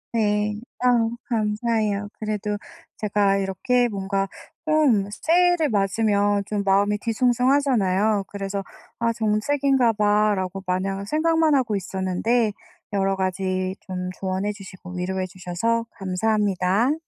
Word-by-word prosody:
네, 210 Hz, -1 st, +1 dB, 0.2 s
아 240 Hz, -2 st, +4 dB, 0.2 s
감사해요. 215 Hz, -2 st, 0 dB
그래도 210 Hz, -1 st, -2 dB, 0.4 s
제가 200 Hz, -1 st, +2 dB
이렇게 240 Hz, +6 st, +1 dB
뭔가 195 Hz, -1 st, -2 dB, 0.4 s
좀 275 Hz, -11 st, +3 dB
새해를 340 Hz, +5 st, +2 dB
맞으면 205 Hz, 0 st, +1 dB
좀 205 Hz, 0 st, -2 dB
마음이 200 Hz, +1 st, +2 dB
뒤숭숭하잖아요. 230 Hz, -4 st, +2 dB
그래서 200 Hz, 0 st, -4 dB, 0.4 s
아 230 Hz, 0 st, +2 dB
'정체기인가 235 Hz, +3 st, +2 dB
봐.'라고 205 Hz, -3 st, +1 dB
마냥 195 Hz, +2 st, -1 dB
생각만 315 Hz, +4 st, +2 dB
하고 240 Hz, -6 st, +1 dB
있었는데, 195 Hz, +4 st, 0 dB, 0.4 s
여러 195 Hz, -1 st, +1 dB
가지 185 Hz, 0 st, -1 dB
좀 180 Hz, -1 st, -4 dB
조언해 190 Hz, +2 st, -1 dB
주시고 190 Hz, -3 st, -11 dB
위로해 185 Hz, +1 st, -2 dB
주셔서 185 Hz, +6 st, -2 dB
감사합니다. 200 Hz, +3 st, +1 dB
210 Hz, 280 characters per minute, -23 LUFS, 195-230 Hz, 0.4 s, 아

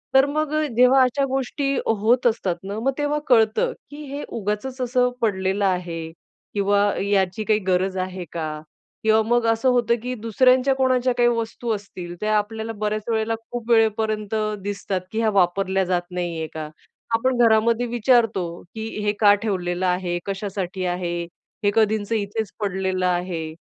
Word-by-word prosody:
तर 265 Hz, +1 st, +7 dB
मग 305 Hz, +1 st, -1 dB, 0.2 s
जेव्हा 250 Hz, +2 st, +6 dB
अशा 265 Hz, +2 st, +1 dB
गोष्टी 270 Hz, +1 st, -1 dB
होत 225 Hz, +4 st, +2 dB
असतात 195 Hz, -6 st, 0 dB
ना, 200 Hz, +2 st, -4 dB
मग 265 Hz, +4 st, +1 dB
तेव्हा 295 Hz, 0 st, 0 dB
कळतं, 235 Hz, -, +3 dB, 0.2 s
की 295 Hz, +1 st, -8 dB
हे 285 Hz, -, -4 dB
उगाचच 225 Hz, +5 st, -3 dB
असं 250 Hz, 0 st, +2 dB
पडलेलं 195 Hz, -2 st, 0 dB
आहे 175 Hz, -3 st, -2 dB, 0.4 s
किंवा 205 Hz, 0 st, +2 dB
याची 195 Hz, 0 st, +1 dB
काही 215 Hz, 0 st, +2 dB
गरज 185 Hz, +1 st, +1 dB
आहे 185 Hz, -1 st, -4 dB
का? 155 Hz, -2 st, -4 dB, 0.4 s
किंवा 220 Hz, 0 st, +4 dB
मग 240 Hz, +1 st, +1 dB
असं 225 Hz, +3 st, +2 dB
होतं, 240 Hz, -1 st, +3 dB
की 250 Hz, -, -3 dB
दुसऱ्यांच्या 255 Hz, +4 st, +3 dB
कोणाच्या 255 Hz, -1 st, +2 dB
काही 240 Hz, 0 st, +4 dB
वस्तू 230 Hz, 0 st, -2 dB
असतील, 180 Hz, -4 st, -8 dB
त्या 215 Hz, 0 st, +2 dB
आपल्याला 220 Hz, +2 st, -3 dB
बऱ्याच 215 Hz, 0 st, -1 dB
वेळेला 220 Hz, 0 st, 0 dB, 0.2 s
खूप 240 Hz, -1 st, -5 dB
वेळेपर्यंत 220 Hz, -1 st, +2 dB, 0.3 s
दिसतात, 195 Hz, -2 st, -3 dB
की 220 Hz, -, -2 dB
ह्या 225 Hz, -1 st, +2 dB
वापरल्या 190 Hz, 0 st, +2 dB
जात 175 Hz, 0 st, -2 dB
नाहीये 170 Hz, -3 st, -3 dB
का? 155 Hz, -1 st, -5 dB, 0.5 s
आपण 255 Hz, +2 st, +1 dB
घरामध्ये 230 Hz, +2 st, +3 dB
विचारतो 235 Hz, -4 st, +2 dB, 0.3 s
की 220 Hz, 0 st, -4 dB, 0.2 s
"हे 205 Hz, -, +2 dB
का 205 Hz, -2 st, +7 dB
ठेवलेलं 185 Hz, -3 st, -1 dB
आहे? 180 Hz, -1 st, 0 dB
कशासाठी 195 Hz, -2 st, -3 dB
आहे? 175 Hz, -1 st, -2 dB, 0.4 s
हे 205 Hz, -, +3 dB
कधींचं 220 Hz, 0 st, +2 dB
इथेच 210 Hz, 0 st, -2 dB
पडलेलं 190 Hz, -2 st, -1 dB
आहे." 175 Hz, -3 st, -2 dB
215 Hz, 155 wpm, -23 LUFS, 185-240 Hz, 0.5 s, तर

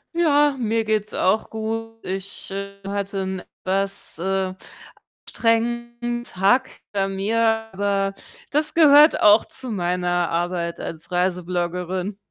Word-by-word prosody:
Ja, 295 Hz, -4 st, +4 dB
mir 225 Hz, -1 st, 0 dB
geht's 215 Hz, -1 st, -1 dB
auch 200 Hz, +4 st, +1 dB
gut. 225 Hz, +1 st, -5 dB
Ich, 195 Hz, +1 st, -6 dB
äh, 200 Hz, 0 st, -5 dB
hatte 200 Hz, 0 st, -3 dB
'n 190 Hz, 0 st, -3 dB, 0.2 s
etwas, 195 Hz, 0 st, -1 dB
äh, 190 Hz, +1 st, -1 dB, 0.7 s
anstrengenden 235 Hz, +1 st, -1 dB
Tag 245 Hz, +6 st, +2 dB, 0.2 s
hinter 195 Hz, -1 st, +1 dB
mir, 195 Hz, +4 st, -1 dB, 0.3 s
aber 195 Hz, 0 st, 0 dB, 0.4 s
das 300 Hz, +1 st, 0 dB
gehört 300 Hz, -1 st, +7 dB
auch 210 Hz, +1 st, +6 dB
zu 260 Hz, -, -8 dB
meiner 175 Hz, -2 st, 0 dB
Arbeit 170 Hz, 0 st, -2 dB
als 165 Hz, +2 st, -7 dB
Reisebloggerin. 180 Hz, +1 st, -1 dB
200 Hz, 115 wpm, -22 LUFS, 185-230 Hz, 0.7 s, gehört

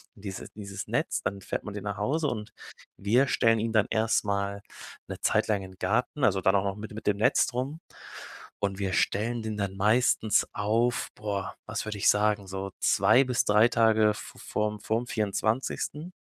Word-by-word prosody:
und 100 Hz, -, -17 dB
dieses 95 Hz, -1 st, -6 dB
dieses 100 Hz, -2 st, -7 dB
Netz, -, -, -1 dB
dann 100 Hz, +1 st, -2 dB
fährt -, -, -4 dB
man 105 Hz, -, -7 dB
den 105 Hz, -, -5 dB
nach 100 Hz, 0 st, -3 dB
Hause 145 Hz, +10 st, 0 dB
und 105 Hz, -4 st, -4 dB, 0.5 s
wir 120 Hz, +7 st, +3 dB
stellen 115 Hz, -4 st, +3 dB
ihn 115 Hz, +1 st, -1 dB
dann 110 Hz, -2 st, +4 dB
erst 110 Hz, -1 st, +1 dB
mal 100 Hz, 0 st, -2 dB, 0.4 s
'ne -, -, -7 dB
Zeit -, -, +2 dB
lang 105 Hz, -2 st, +1 dB
in 95 Hz, -, -10 dB
den 95 Hz, -, -22 dB
Garten, 125 Hz, +8 st, 0 dB
also 95 Hz, -2 st, +2 dB
dann 95 Hz, +1 st, +3 dB
auch 95 Hz, -, +3 dB
noch 100 Hz, -1 st, -2 dB
mit 105 Hz, +1 st, -7 dB
de 105 Hz, -, -9 dB
mit 110 Hz, -, -8 dB
dem 100 Hz, -1 st, +2 dB
Netz 105 Hz, -, +3 dB
drum 135 Hz, +5 st, -3 dB, 0.8 s
und 100 Hz, -1 st, -1 dB
wir 95 Hz, -1 st, -1 dB
stellen 110 Hz, +7 st, 0 dB
den 110 Hz, -1 st, -3 dB
dann 100 Hz, -1 st, -3 dB
meistens 110 Hz, +1 st, +3 dB
auf 115 Hz, +4 st, 0 dB
boah, 100 Hz, -2 st, -4 dB
was 110 Hz, +1 st, -3 dB
würde 105 Hz, -1 st, -5 dB
ich -, -, +4 dB
sagen, 105 Hz, -1 st, +2 dB
so 95 Hz, +1 st, -5 dB
2 110 Hz, +7 st, +5 dB
bis 125 Hz, -2 st, 0 dB
3 105 Hz, +3 st, +5 dB
Tage 110 Hz, -2 st, +4 dB
v -, -, -10 dB
vorm 105 Hz, 0 st, -2 dB
vorm 115 Hz, +2 st, -1 dB
24. 115 Hz, -, -2 dB
105 Hz, 200 wpm, -28 LUFS, 100-115 Hz, 0.8 s, 2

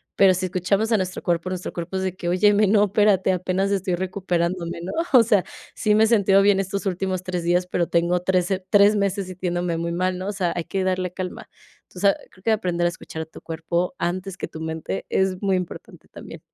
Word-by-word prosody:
Pero, 195 Hz, -1 st, +6 dB
si 185 Hz, +1 st, -2 dB
escuchamos 195 Hz, +5 st, 0 dB
a 225 Hz, -, +4 dB
nuestro 185 Hz, -1 st, -3 dB
cuerpo 175 Hz, +1 st, 0 dB
nuestro 185 Hz, -1 st, -5 dB
cuerpo 175 Hz, +2 st, -4 dB
es 190 Hz, -, -2 dB
de 185 Hz, -1 st, -2 dB
que, 175 Hz, -2 st, -4 dB
óyeme, 205 Hz, +3 st, +4 dB
no, 205 Hz, 0 st, +4 dB
espérate, 200 Hz, -2 st, +3 dB
apenas 185 Hz, +2 st, -1 dB
estoy 190 Hz, -2 st, 0 dB
recuperándome, 175 Hz, -2 st, -2 dB
¿no? 180 Hz, -, -5 dB, 0.2 s
O 245 Hz, -3 st, +8 dB
sea, 210 Hz, -5 st, +3 dB, 0.3 s
sí 210 Hz, -1 st, +1 dB
me 220 Hz, +1 st, +5 dB
he -, -, +1 dB
sentido 200 Hz, -3 st, +4 dB
bien 200 Hz, -1 st, +4 dB
estos 195 Hz, +1 st, -3 dB
últimos 185 Hz, -1 st, -1 dB
3 180 Hz, -2 st, -3 dB
días, 180 Hz, +1 st, +1 dB
pero, 175 Hz, -1 st, 0 dB
tengo 170 Hz, +1 st, +1 dB
3 180 Hz, -1 st, +1 dB
se 190 Hz, 0 st, 0 dB
3 205 Hz, 0 st, +5 dB
meses 200 Hz, -1 st, -1 dB
sintiéndome 175 Hz, -2 st, -2 dB
muy 170 Hz, +1 st, -2 dB
mal, 185 Hz, +1 st, -1 dB
¿no? 185 Hz, -, -5 dB
O 205 Hz, -, -1 dB
sea, 185 Hz, -4 st, -1 dB
hay 175 Hz, -, -2 dB
que 190 Hz, -1 st, -2 dB
darle 185 Hz, -1 st, -1 dB
calma. 185 Hz, 0 st, -6 dB, 0.4 s
Tú 180 Hz, -, -11 dB
sabes 200 Hz, 0 st, +3 dB
creo 185 Hz, -, -21 dB
que 225 Hz, -, +2 dB
aprender 180 Hz, -5 st, 0 dB
a -, -, +3 dB
escuchar 160 Hz, -1 st, -7 dB
tu 160 Hz, -, -14 dB
cuerpo 170 Hz, +5 st, -2 dB
antes 185 Hz, +2 st, -3 dB
que -, -, -4 dB
tu 160 Hz, -, -9 dB
mente 160 Hz, -12 st, -4 dB
es 190 Hz, -1 st, 0 dB
muy 195 Hz, -2 st, +1 dB
importante 180 Hz, -2 st, -8 dB
también. -, -, -11 dB
185 Hz, 225 wpm, -23 LUFS, 175-195 Hz, 0.4 s, O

